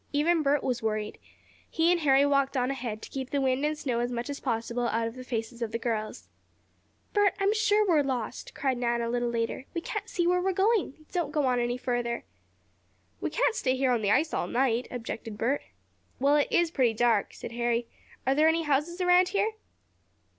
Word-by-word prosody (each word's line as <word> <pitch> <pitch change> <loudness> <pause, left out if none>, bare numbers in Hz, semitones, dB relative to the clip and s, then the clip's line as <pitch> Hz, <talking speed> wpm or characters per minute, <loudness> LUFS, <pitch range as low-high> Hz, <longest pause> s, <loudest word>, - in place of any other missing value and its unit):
Even 315 +3 +2
Bert 285 -1 +2
was 250 -2 -1
worried. 215 -1 -2 0.5
He 330 +2 +2
and 350 -1 +2
Harry 275 -1 +5
walked 275 -1 +2
on 250 +1 +1
ahead, 235 -5 -5
to - - -8
keep 265 -1 -4
the 285 - 0
wind 265 0 +1
and 305 +1 0
snow 255 -6 -1
as 240 +1 -1
much 245 +3 -3
as 280 - -5
possible 235 -1 -1
out 230 0 0
of 230 - -6
the 255 +1 -9
faces 235 -1 -4
of 230 -2 -2
the 230 - -1
girls. 225 -2 -3 0.9
"Bert, 410 -2 +3
I'm 395 +1 +3
sure 425 -1 +3
we're 325 -5 +4
lost!" 255 -5 -4
cried 265 -3 -1
Nan 235 -1 0
a 230 - -2
little 240 0 0
later. 230 +2 -2
"We 335 - -1
can't 425 +4 -5
see 350 -8 0
where 360 +1 +3
we're 380 +1 0
going! 385 - +1
Don't 345 -5 -1
go 295 -2 +1
on 250 -1 +2
any 240 +1 -1
farther." 240 -1 -2 1.0
"We - - -2
can't - - +1
stay 260 - 0
here 260 -1 +1
on 240 -2 +1
the 205 - 0
ice 300 +9 +2
all - - -1
night," 245 +1 +1
objected 225 -2 -6
Bert. 255 +6 0 0.6
"Well, 280 +3 +4
it 295 - +3
is 345 -1 +2
pretty 245 -7 +2
dark," 230 -3 +2
said - - -7
Harry. 235 0 0 0.4
"Are 265 - +3
there 305 +3 +4
any 330 +1 +2
houses 305 +5 0
around 360 0 +5
here?" 415 +3 +1
265 Hz, 210 wpm, -28 LUFS, 235-320 Hz, 1.0 s, Harry